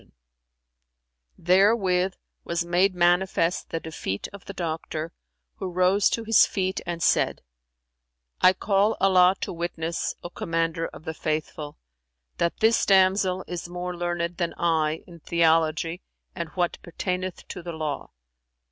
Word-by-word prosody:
"[FN#344] - - -27 1.3
Therewith 190 -1 +3 0.3
was 170 0 -2
made 180 +2 +2
manifest 175 0 +2
the 165 - -2
defeat 160 -12 -4
of 200 - -11
the 200 - -7
doctor, 160 -2 -4 0.5
who 190 - -4
rose 185 +3 +3
to 230 - -2
his 225 0 +5
feet 190 -1 -2
and 170 -1 -3
said, - - +2 1.0
"I 185 0 +7
call 200 +3 +1
Allah 185 -1 +5
to - - -3
witness, 170 -1 -3
O 175 - -6
Commander 165 -1 -1
of - - -13
the 160 - -4
Faithful, 155 -1 -4 0.6
that 170 - -1
this 225 +1 +4
damsel 190 -1 +3
is 175 -1 -5
more 180 0 -4
learned 175 0 -2
than 170 -2 -2
I 160 -2 +1
in 170 -2 -13
theology 165 +1 +1 0.3
and 170 -2 -4
what 175 -2 -1
pertaineth 180 +1 -4
to 180 - -6
the 170 0 -6
Law." 155 -3 -4
175 Hz, 140 wpm, -25 LUFS, 165-185 Hz, 1.3 s, I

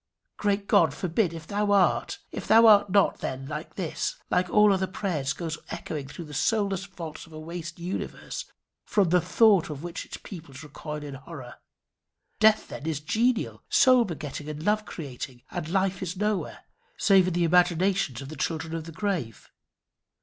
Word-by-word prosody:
Great 200 -1 0
God, 155 -4 +4
forbid 175 +2 0
if 165 -1 -8
thou 205 +2 0
art. 195 -3 +3
If - - -6
thou 225 +1 +7
art 205 -2 +7
not, 200 +1 +3
then 130 +1 -4 0.3
this, 175 -5 -2 0.2
like 180 0 +2
all 210 +2 +5
other 190 0 0
prayers, 170 -8 -2
goes 165 +3 -4
echoing 145 -4 -5
through 160 +5 -8
the 150 - -11
soulless 195 +4 0
vaults 165 -4 -8
of 160 - -16
a 155 - -7
waste 170 +1 -7
universe, 175 +2 -5 0.4
from 200 -5 +2
the 180 +1 +4
thought 205 -2 +4
of 150 0 -6
which 175 +1 -5
its - - -7
peoples 155 -8 -10
recoil 150 0 -7
in 145 -1 -7
horror. 135 -3 -10 0.8
Death, 220 0 +4
then, 145 - -7
is 155 -3 -1
genial, 230 - 0
soul 255 -2 +6
begetting, 155 -5 -6
and 155 0 -6
love 210 +2 +1
creating; 130 -5 -7
and 175 -3 -4
Life 190 0 0
is 185 0 -4
nowhere, 210 0 -2 0.3
save 195 -3 +5
in 180 - -1
the 175 - +2
imaginations 175 -5 +2
of 135 - -9
the 155 - -7
children 160 0 -3
of 165 -1 -4
the 165 - -8
grave. 165 - -3
175 Hz, 175 wpm, -27 LUFS, 155-200 Hz, 0.8 s, thou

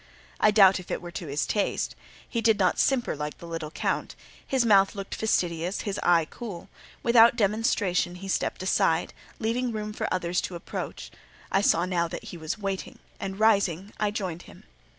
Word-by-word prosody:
I 215 - +5
doubt 195 -3 +6
if 180 - -11
it - - -2
were 175 -1 -9
to 170 -1 -6
his 145 +2 -1
taste: 205 - -1 0.3
he 230 - -2
did 225 -2 +4
not 185 -3 +2
simper 260 - +2
like 150 0 -5
the - - -11
little 165 -2 -5
Count; - - -2 0.3
his 260 -3 +1
mouth 200 -1 +5
looked 195 -1 -6
fastidious, 175 -4 0
his 200 -1 -3
eye 170 -2 +4
cool; 205 -8 -8 0.3
without 235 0 +6
demonstration 200 -4 +1
he 190 +2 -8
stepped 190 - -1
aside, 190 - +1 0.2
leaving 240 +2 -1
room 210 -1 -4
for - - -3
others 180 -1 0
to 180 - -5
approach. 170 - -6 0.4
I 195 - +3
saw 170 -3 +3
now 175 -2 0
that - - -7
he - - -8
was 160 +5 -4
waiting, 195 -2 -4 0.2
and, 195 +1 -5
rising, 200 -3 +2
I 210 - +2
joined 190 -6 -4
him. - - -15
195 Hz, 185 wpm, -27 LUFS, 175-215 Hz, 0.4 s, doubt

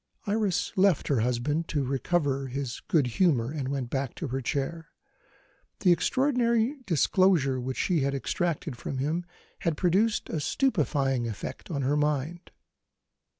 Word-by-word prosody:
Iris 205 -2 0
left 190 -4 +3
her 140 -5 +2
husband 125 +8 0
to 145 -3 -1
recover 135 +1 0
his 130 -1 -4
good 155 -5 +3
humour, 125 -2 +2
and 145 -4 -3
went 135 -3 -3
back 135 -2 -2
to 160 - -4
her 135 +2 -2
chair. 145 +5 -3 0.9
The 185 - +5
extraordinary 245 - +2
disclosure 165 -6 +3
which 130 +1 -4
she 175 -4 +1
had 140 0 0
extracted 160 +1 -2
from 130 +3 -5
him 160 +6 -1 0.3
had 165 -3 -1
produced 195 +5 +2
a 160 - -1
stupefying 140 - +1
effect 110 - -6
on 140 -5 -2
her 140 +3 +1
mind. 150 +3 -1
150 Hz, 145 wpm, -28 LUFS, 135-175 Hz, 0.9 s, The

